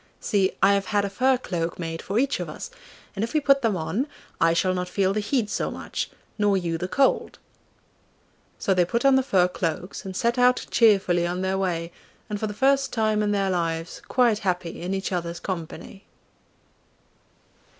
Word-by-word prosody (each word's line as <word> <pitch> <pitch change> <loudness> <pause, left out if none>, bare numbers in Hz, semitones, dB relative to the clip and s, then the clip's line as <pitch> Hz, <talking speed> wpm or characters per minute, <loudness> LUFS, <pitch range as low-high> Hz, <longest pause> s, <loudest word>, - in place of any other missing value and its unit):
See, 195 -2 +1
I 200 +1 +6
have 200 -1 0
had 205 -1 +1
a 200 - -4
fur 260 +6 +3
cloak 170 -8 -3
made 165 -1 -4
for 200 - -3
each 275 +3 +1
of - - -4
us, - - -7 0.4
and 200 - -2
if 230 +7 -4
we - - +5
put 275 -1 +4
them 220 -6 +1
on 210 - -2 0.3
I 165 0 +4
shall 185 +2 +1
not 180 0 -3
feel 190 0 +1
the 215 - 0
heat 215 +2 0
so 210 - -2
much - - -4 0.3
nor 205 -1 +3
you 170 -3 -2
the 180 - -2
cold.' 265 +9 +1 1.2
So 195 - +1
they 180 -1 +4
put 235 +9 -1
on 275 - +6
the 265 - +4
fur 190 -9 +3
cloaks, 175 0 -4
and 190 -1 -7
set 235 +3 +1
out 250 0 +4
cheerfully 190 -6 +4
on 180 +1 -2
their 190 0 0
way, 170 -3 -2 0.4
and 205 - -2
for 215 - -1
the 210 - -6
first 275 +2 +2
time 215 -2 +1
in 210 - +1
their 195 -2 +1
lives 165 -1 -2
quite 240 -4 +3
happy 180 -5 -2
in 185 +3 -2
each 190 +1 -3
other's 170 -1 -3
company. 180 +2 -6
195 Hz, 195 wpm, -25 LUFS, 180-225 Hz, 1.2 s, I